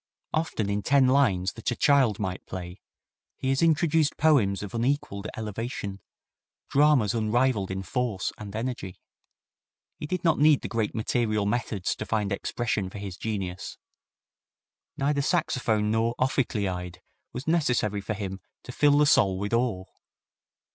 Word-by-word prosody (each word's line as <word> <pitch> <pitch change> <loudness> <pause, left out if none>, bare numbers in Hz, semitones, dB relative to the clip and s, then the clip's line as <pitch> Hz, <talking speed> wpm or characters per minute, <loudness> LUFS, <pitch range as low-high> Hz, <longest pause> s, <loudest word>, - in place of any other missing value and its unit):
Often 155 -9 -1
in 100 +1 0
ten 140 +4 +4
lines 110 -9 +2
that 115 - -3
a 120 - -1
child 135 -8 +3
might 95 -3 -4
play 90 0 -7 0.6
he 130 - -2
has 135 0 +1
introduced 160 -1 +2
poems 120 -12 +3
of 100 - -7
unequalled 115 -4 -1
elevation, 105 -2 -4 0.7
dramas 140 -7 +4
unrivalled 115 -2 +1
in 95 0 -3
force 110 -1 -2
and 105 -1 -8
energy. 110 -5 -4 1.0
He 150 - -5
did 180 +2 -3
not 165 -4 +3
need 150 -1 +5
the - - -2
great 110 -2 -2
material 110 -2 0
methods 105 -3 -1
to 105 - -4
find 105 -3 0
expression 105 -1 -2
for 100 - -9
his 100 -3 -6
genius. 95 -5 -4 1.2
Neither 140 +1 +1
saxophone 115 -9 +1
nor 115 +1 +1
ophicleide 100 -9 -1 0.3
was 125 +3 -6
necessary 125 - +1
for 110 +2 -3
him 95 -2 -5 0.2
to - - -8
fill 145 -1 +4
the 150 - +5
soul 105 -10 +4
with 100 +3 -3
awe. 115 -6 0
110 Hz, 145 wpm, -27 LUFS, 100-135 Hz, 1.2 s, need